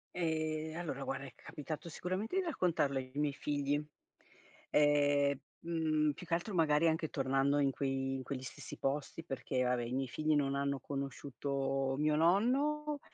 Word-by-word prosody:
Ehm, 160 -2 -1
allora 155 -6 -3
guarda 135 0 -3
è 135 - -8
capitato 155 +3 -6
sicuramente 185 - -3
di 385 - +3
raccontarlo 175 - +1
ai 130 -1 -4
miei 145 0 +1
figli, 145 0 0 0.9
ehm, 145 -1 +4 0.2
mhmm, 155 -2 +1
più 180 - -10
che 170 - -3
altro 175 +5 0
magari 160 -2 +4
anche 160 -1 0
tornando 135 +1 +2
in 140 -1 +3
quei 135 0 -1
in 130 - -5
quegli 130 -1 -4
stessi 130 - -8
posti 145 +4 -2
perché 135 -3 -1
vabbè 125 -1 +1
i 120 +1 -4
miei 135 0 0
figli 155 +4 +1
non 140 -1 +2
hanno 140 0 0
conosciuto 135 0 -2
mio 150 0 +3
nonno 275 - +2
145 Hz, 160 wpm, -35 LUFS, 135-165 Hz, 0.9 s, ehm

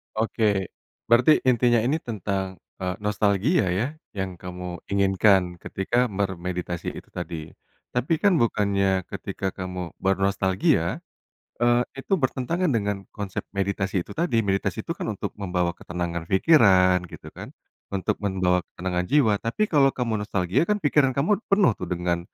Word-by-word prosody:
Oke, 110 -3 0 0.4
berarti 120 +5 +6 0.2
intinya 120 -1 +4
ini 135 +6 +1
tentang, 100 - -3 0.2
eee, 90 -1 -2
nostalgia 105 - +2
ya 105 +7 0 0.3
yang 95 -3 -4
kamu 90 -1 -6
inginkan 95 -2 +3
ketika 120 +9 0
bermeditasi 90 -4 -3
itu - - -10
tadi, 80 -1 -6 0.4
tapi 125 +6 0
kan 200 -2 +4
bukannya 100 -4 +1
ketika 95 - -4
kamu 90 -2 -5
bernostalgia, 95 0 +1 0.6
eee, 120 0 +4
itu 135 - -7
bertentangan 135 +8 0
dengan 105 -5 0 0.2
konsep 100 -3 -4
meditasi 95 -1 -1
itu - - -10
tadi 165 -6 0
meditasi 100 -1 -1
itu - - -2
kan - - -3
untuk - - -5
membawa 90 -3 -1
ketenangan 85 -1 -4
pikiran 95 - +5
gitu - - -11
kan, - - -9 0.5
untuk 100 +2 -1
membawa 90 -3 +1
ketenangan 90 0 -2
jiwa 135 -6 +4
tapi 115 - 0
kalau 140 -3 +5
kamu 120 -3 -1
nostalgia 95 - 0
kan 210 - +3
pikiran 140 -3 +3
kamu 185 +10 +2
penuh 195 - +5
tuh 90 - -5
dengan, 90 -1 -1
100 Hz, 140 wpm, -25 LUFS, 90-120 Hz, 0.6 s, berarti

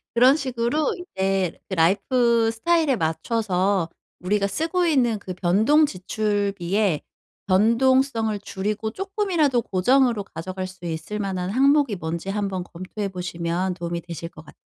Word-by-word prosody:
그런 255 +4 +6
식으로 260 +2 -1
이제 195 - -2
그 - - -4
라이프스타일에 235 - +2
맞춰서 185 +1 0 0.3
우리가 200 +2 0
쓰고 330 - 0
있는 250 -9 +2
그 185 -2 -6
변동 210 - +3
지출비에 200 - -1 0.5
변동성을 230 +2 +3
줄이고 210 +2 -3
쪼끔이라도 365 - 0
고정으로 235 +3 +2
가져갈 185 +1 -6
수 185 -1 -12
있을 165 +5 -4
만한 190 -3 -2
항목이 275 0 +3
뭔지 170 +3 -4
한번 195 -2 -2
검토해 185 +4 -6
보시면 180 0 -2
도움이 170 -1 -4
되실 170 0 -7
것 155 - -14
같아요. - - -16
205 Hz, 320 characters per minute, -23 LUFS, 185-250 Hz, 0.5 s, 그런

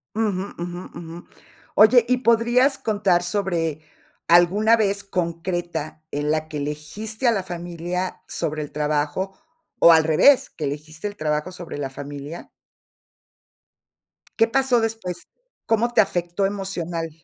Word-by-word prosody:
Ujú, 205 -3 -1
ujú, 175 +1 -5
ujú. 170 0 -9 0.5
Oye, 230 +2 +7
¿y 250 0 +3
podrías 240 +3 +3
contar 205 -5 +1
sobre 175 -5 -1 0.5
alguna 190 +7 +5
vez 200 -2 0
concreta 170 -3 -3
en 145 +1 -1
la 155 0 -1
que 155 -2 -6
elegiste 175 - -4
a - - +6
la 195 -4 -1
familia 175 +1 -4
sobre 155 -2 -3
el 145 - -9
trabajo, 150 +5 -1 0.4
o 170 - +8
al 160 -1 +5
revés, 160 - +5
que 155 - -8
elegiste 155 +6 -5
el 205 - -7
trabajo 150 +3 -1
sobre 175 -4 -8
la 135 -2 -3
familia? 145 +4 -8 1.9
¿Qué 225 - +5
pasó 260 0 +2
después? 200 -6 -4 0.4
¿Cómo 230 +2 +1
te - - +3
afectó 175 0 -1
emocional? 175 -4 -3
175 Hz, 130 wpm, -23 LUFS, 155-210 Hz, 1.9 s, o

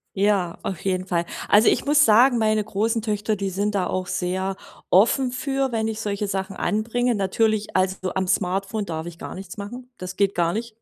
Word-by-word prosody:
Ja, 195 -3 +1
auf 185 - -4
jeden 185 -1 -1
Fall. 175 -2 0 0.2
Also, 210 +2 +5
ich - - 0
muss 295 +1 +5
sagen, 240 +3 +5
meine 215 -1 +2
großen 220 +2 -1
Töchter, 210 0 -1
die 195 -1 -2
sind 205 +3 -1
da 185 -2 +1
auch 185 0 -2
sehr 190 +2 -2 0.3
offen 245 +7 +4
für, 270 +1 -1
wenn 220 -1 0
ich 220 -1 -3
solche 205 -1 -2
Sachen 195 0 -3
anbringe. 235 +3 0
Natürlich 215 +2 0
also, 185 0 0
am 190 -1 0
Smartphone 195 +3 -1
darf 160 -2 -4
ich 170 0 -9
gar - - -7
nichts 190 0 -9
machen. 245 +5 -8
Das 185 0 -7
geht 200 -1 +2
gar 170 -1 +1
nicht. 230 0 -5
205 Hz, 200 wpm, -23 LUFS, 190-220 Hz, 0.3 s, Also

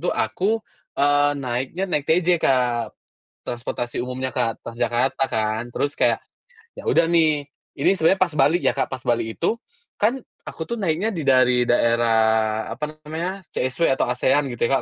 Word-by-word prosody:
tuh - - -2
aku, 215 +4 0 0.3
eee, 145 0 +3
naiknya 130 +7 -3
naik 150 -6 -2
TJ, 175 +1 +3
Kak. 125 -3 +1 0.5
Transportasi 120 0 -3
umumnya, 130 +1 -4
Kak, 115 - -1
Transjakarta 120 +3 -1
kan. 110 +1 0
Terus 145 +3 -2
kayak, - - +2 0.6
ya - - -9
udah 165 - +4
nih 155 -4 +2 0.3
ini - - +3
sebenarnya 185 +2 +3
pas 175 -5 +1
balik 150 +5 +3
ya, - - +3
Kak. 135 - -1
Pas 130 -1 -6
balik 115 -1 -1
itu, 170 - +1 0.4
kan 230 +6 +1 0.2
aku 160 - -7
tuh 235 - -3
naiknya 200 +1 -1
di 165 - -3
dari 130 -2 +4
daerah, 110 -2 +2
apa 155 0 -6
namanya, 170 +5 -3 0.2
CSW 135 +3 +1
atau 125 - 0
ASEAN 135 +3 +1
gitu 120 -1 -1
ya 135 - +2
135 Hz, 160 wpm, -22 LUFS, 120-165 Hz, 0.6 s, udah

